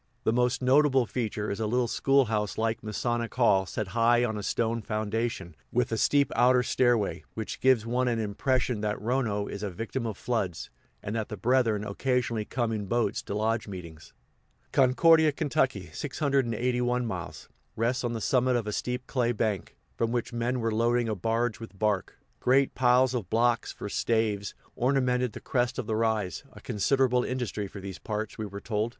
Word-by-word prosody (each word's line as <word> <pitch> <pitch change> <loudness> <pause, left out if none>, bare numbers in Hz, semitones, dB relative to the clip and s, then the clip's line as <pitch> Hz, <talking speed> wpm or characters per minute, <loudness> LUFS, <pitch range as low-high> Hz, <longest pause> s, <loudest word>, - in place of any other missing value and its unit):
The 110 - +2
most 125 +2 +1
notable 135 -1 +4
feature 110 -3 -3
is 100 - -4
a 110 - 0
little 125 +2 +1
school 135 +3 +3
house 105 -2 -2
like 110 0 0
Masonic 115 +2 -2
hall 100 -7 +3
set 105 -1 -4
high 120 +2 +3
on 110 -2 -2
a 105 - -4
stone 115 +2 -1
foundation, 110 -4 -3 0.2
with 120 -1 +1
a - - +1
steep 140 -1 +3
outer 125 0 +4
stairway 120 -5 +1
which 110 -1 -5
gives 130 -4 +3
one 125 +2 0
an 120 -2 +1
impression 115 +2 0
that 105 0 -1
Rono 110 -3 0
is 100 - -6
a 105 - -2
victim 115 +6 -4
of 105 -3 -5
floods, 105 -9 -2 0.3
and 105 - -4
that 110 -2 -2
the 105 - -5
brethren 115 -1 +2
occasionally 115 0 -1
come 120 -1 -1
in 105 -3 -3
boats 120 -1 0
to 100 - -5
lodge 110 +1 0
meetings. 85 -5 -9 0.6
Concordia, 155 +4 +5
Ky. 130 - -1
(681 125 - 0
miles), 90 -7 -6 0.3
rests 120 +3 0
on 120 -1 -1
the 115 - -3
summit 125 +2 +2
of 120 -3 0
a 105 - -3
steep 125 +3 -3
clay 120 -2 0
bank, 105 -4 -2 0.2
from 115 0 0
which 120 0 -2
men 120 +2 -1
were 115 -1 0
loading 120 +1 +2
a - - 0
barge 115 +3 -1
with 110 -4 -10
bark. 105 -2 -1 0.2
Great 135 +2 +3
piles 125 0 +3
of 115 -8 -3
blocks, 115 +1 +2
for - - -7
staves, 105 -2 0 0.2
ornamented 125 -2 +1
the - - -7
crest 125 -2 -1
of - - -2
the 110 - -1
rise 110 -3 0
a - - -12
considerable 125 +2 +1
industry 120 -5 -3
for 100 - -9
these 95 -3 -7
parts, 110 +2 -4
we 110 - -3
were 100 0 -7
told. 110 +1 -1
115 Hz, 185 wpm, -28 LUFS, 105-125 Hz, 0.6 s, Concordia